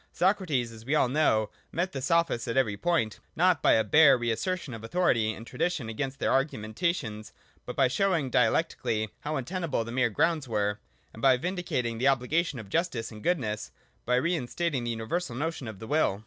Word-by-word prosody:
Socrates, 175 - +1
as 110 -1 -12
we 140 +6 0
all 150 - +4
know, 120 -6 +2 0.2
met 180 +2 -1
the 135 - -5
Sophists 165 -4 +1
at 115 - -2
every 110 -6 +2
point, 115 -3 0 0.2
not 175 -3 +3
by - - +5
a 110 - +4
bare 150 -1 +6
re 120 -1 -1
assertion 175 +3 -3
of 115 - -7
autho 115 +11 -4
rity 110 -5 +2
and 115 - -10
tradition 130 -1 -2
against 135 +4 -3
their - - 0
argumentations, 110 -2 -1 0.4
but - - -5
by - - +4
show 195 +8 +1
ing 140 -6 -2
dialectically 110 -2 +1
how 150 +1 -3
untenable 155 -1 -2
the 115 - -7
mere 125 -1 +2
grounds 155 +6 +1
were, 105 -2 -1 0.3
and 110 - -11
by 130 -1 +5
vindicating 130 -9 -2
the 130 - +2
obligation 140 +4 +1
of 110 -3 -8
justice 125 - -1
and 105 -1 -10
goodness, 115 -11 -1 0.2
— - - -39
by 125 - +3
re 155 +7 +1
instating 150 -2 -2
the - - -2
universal 115 +6 -3
or - - -5
notion 160 -4 -3
of 110 -3 -7
the 110 - -9
will. 130 -7 +1
130 Hz, 205 wpm, -28 LUFS, 115-165 Hz, 0.4 s, bare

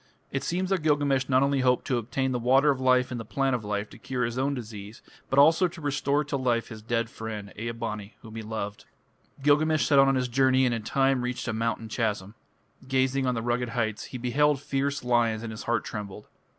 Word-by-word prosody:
It 135 - -2
seems 185 +2 -1
that 190 -3 +1
Gilgamesh 145 -3 +1
not 130 0 +4
only 140 0 +1
hoped 125 -1 +2
to 130 -4 0
obtain 130 +3 -2
the 125 - -1
Water 135 +5 +4
of 135 - -2
Life 130 0 +3
and 120 - -3
the - - -5
Plant 135 +4 0
of 120 - -4
Life 105 0 -2
to - - -13
cure 125 -1 -2
his 115 0 -4
own 135 +2 0
disease, 110 -2 -8 0.3
but 135 - -1
also 160 +6 +6
to 175 0 -11
restore 145 0 0
to 145 -1 -3
life 120 -3 0
his 110 -2 -9
dead 115 +1 -1
friend, 110 -3 -7
Ea 115 +2 -4
bani, 110 -3 -5
whom 110 -1 -11
he 115 - -4
loved. 105 -1 -5 0.6
Gilgamesh 150 +2 +3
set 140 -2 +4
out 135 - +6
on 135 - +3
his 130 -1 0
journey 130 +1 +3
and 125 - +1
in 115 - -2
time 135 +3 +1
reached 125 +1 -3
a 115 - -1
mountain 115 0 -2
chasm. 105 -3 -2 0.5
Gazing 130 0 +1
on 125 - +1
the 115 - -3
rugged 120 0 -1
heights, 110 -2 -2
he 130 - -7
beheld 140 +4 +2
fierce 140 0 -2
lions 120 -2 +1
and 115 - -5
his 110 - -8
heart 120 -1 0
trembled. 105 -1 -7
125 Hz, 230 wpm, -27 LUFS, 115-135 Hz, 0.6 s, also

